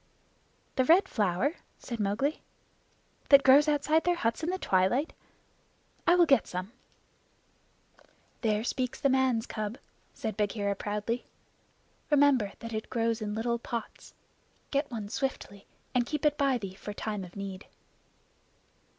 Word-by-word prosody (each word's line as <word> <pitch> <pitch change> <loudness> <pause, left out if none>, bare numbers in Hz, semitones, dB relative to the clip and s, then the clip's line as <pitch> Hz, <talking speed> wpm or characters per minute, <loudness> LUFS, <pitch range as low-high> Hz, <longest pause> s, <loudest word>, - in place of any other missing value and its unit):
"The 260 - +3
Red 365 +7 +5
Flower?" 215 - 0 0.2
said 235 -3 -6
Mowgli. 210 +10 0 0.9
"That 280 -1 +8
grows 280 +3 +7
outside 300 +2 +2
their 355 0 +2
huts 230 -7 -1
in 325 - -2
the 375 - -1
twilight. 215 - +1 0.9
I 345 - +6
will 350 -1 +6
get 275 - +3
some." 185 +3 -5 1.7
"There 215 -2 +1
speaks 255 +1 -2
the 280 - +2
man's 260 -3 +2
cub," 215 0 -4 0.4
said 220 -6 -4
Bagheera 205 -1 0
proudly. 210 +4 -3 0.8
"Remember 280 -8 +4
that 230 0 -6
it 220 0 -4
grows 230 -1 0
in 210 -1 -3
little 235 +1 -1
pots. 230 -1 -7 0.6
Get 280 +1 0
one 220 -5 -5
swiftly, 205 -4 -4 0.3
and 250 -1 +3
keep 300 -1 -3
it 295 -1 +4
by 275 -3 +2
thee 195 -5 -6
for 205 +2 -8
time 210 -1 -4
of 175 -1 -11
need." 195 -1 -7
235 Hz, 140 wpm, -29 LUFS, 210-280 Hz, 1.7 s, That